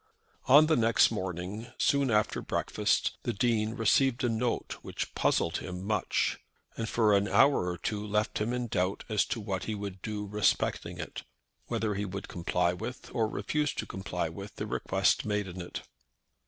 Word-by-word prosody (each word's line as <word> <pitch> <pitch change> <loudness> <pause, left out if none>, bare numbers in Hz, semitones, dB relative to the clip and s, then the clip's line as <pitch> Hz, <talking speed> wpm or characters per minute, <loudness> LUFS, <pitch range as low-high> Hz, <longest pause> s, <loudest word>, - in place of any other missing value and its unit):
On 145 +4 +8
the 155 0 +3
next 115 -1 +4
morning, 95 +2 -4
soon 140 -2 +2
after 105 -2 +1
breakfast, - - 0
the 120 - -2
Dean 110 0 +1
received 120 +3 +3
a 120 - +2
note 115 +1 -1
which - - -5
puzzled 80 -1 +1
him 90 0 -6
much, 105 -2 0 0.4
and 115 -1 -3
for 110 -3 +4
an 100 +1 +2
hour 135 -5 +4
or 90 - -3
two 105 +2 -3
left 105 0 0
him 110 +3 0
in 125 0 -1
doubt 95 -4 -1
as 105 -3 +2
to 120 - -3
what 100 -3 -3
he 110 - -2
would 100 -2 -6
do 105 -1 -4
respecting 105 0 0
it, - - -6 0.5
whether 110 -2 -1
he 100 +1 -2
would 100 0 -6
comply 90 0 0
with, 115 +7 -7
or 115 -3 +2
refuse 150 +6 -1
to - - -3
comply 95 0 -3
with, - - -8
the - - -4
request - - +1
made 105 -1 -1
in 90 0 -6
it. 85 - -6
105 Hz, 180 wpm, -30 LUFS, 95-115 Hz, 0.5 s, On